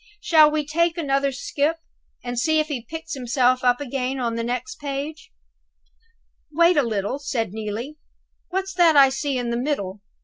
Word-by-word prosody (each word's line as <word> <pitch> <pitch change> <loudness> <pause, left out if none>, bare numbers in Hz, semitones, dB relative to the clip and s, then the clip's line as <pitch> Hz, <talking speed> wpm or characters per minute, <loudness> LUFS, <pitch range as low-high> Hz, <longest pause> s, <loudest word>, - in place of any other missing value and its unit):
Shall 320 -8 +6
we 300 -1 -1
take 335 +3 +1
another 275 -3 +1
skip, 290 +4 -1 0.5
and 245 -1 -3
see 315 +5 +2
if 310 0 -1
he 255 -5 -5
picks 325 0 -6
himself 255 -1 +1
up 245 -1 +3
again 265 -1 -3
on 235 -2 -1
the 230 0 -2
next 250 +2 -4
page?" 290 +2 -5 1.2
"Wait 340 +3 +4
a 290 - +5
little," 220 +1 -2
said 230 -8 -3
Neelie; 220 +7 -5 0.5
"what's 385 +1 -3
that 340 -4 +4
I 275 -1 +8
see 275 0 -2
in 240 -1 -2
the 235 - -1
middle?" 210 -8 -3
275 Hz, 170 wpm, -23 LUFS, 245-310 Hz, 1.2 s, I